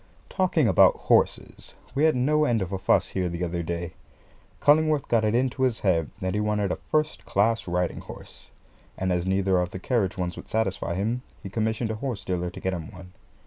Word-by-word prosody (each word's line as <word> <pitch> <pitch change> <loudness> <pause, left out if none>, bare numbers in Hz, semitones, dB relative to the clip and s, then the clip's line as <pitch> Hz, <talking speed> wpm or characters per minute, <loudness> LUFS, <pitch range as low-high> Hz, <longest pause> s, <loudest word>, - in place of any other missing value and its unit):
Talking 180 - +2
about - - +6
horses, - - 0 0.2
we 145 +3 +2
had 160 - +4
no 150 +5 +2
end 115 -8 +1
of 95 - -7
a 95 - -2
fuss 95 - +2
here 90 -2 -1
the 85 +1 -4
other 85 0 -2
day. 85 0 -4 0.7
Cullingworth 155 0 +3
got 115 -2 +2
it 110 +1 +1
into 130 +2 0
his 125 -3 +1
head 85 -6 +1
that 95 0 -1
he 105 - 0
wanted 105 -2 0
a - - 0
first 155 0 0
class 110 +2 +1
riding 90 0 -1
horse; - - -12 0.5
and 95 0 -1
as 90 +1 -1
neither 95 -1 +2
of 90 0 -1
the 95 - -7
carriage 100 -2 -1
ones 90 -1 -2
would - - -9
satisfy 95 -5 -1
him, 110 +6 -1 0.2
he 95 - -7
commissioned 110 +1 -1
a - - -3
horse 120 -9 -4
dealer 90 -1 -2
to - - -10
get 95 - -2
him 85 -4 -5
one. 90 0 -12
100 Hz, 210 wpm, -26 LUFS, 90-120 Hz, 0.7 s, about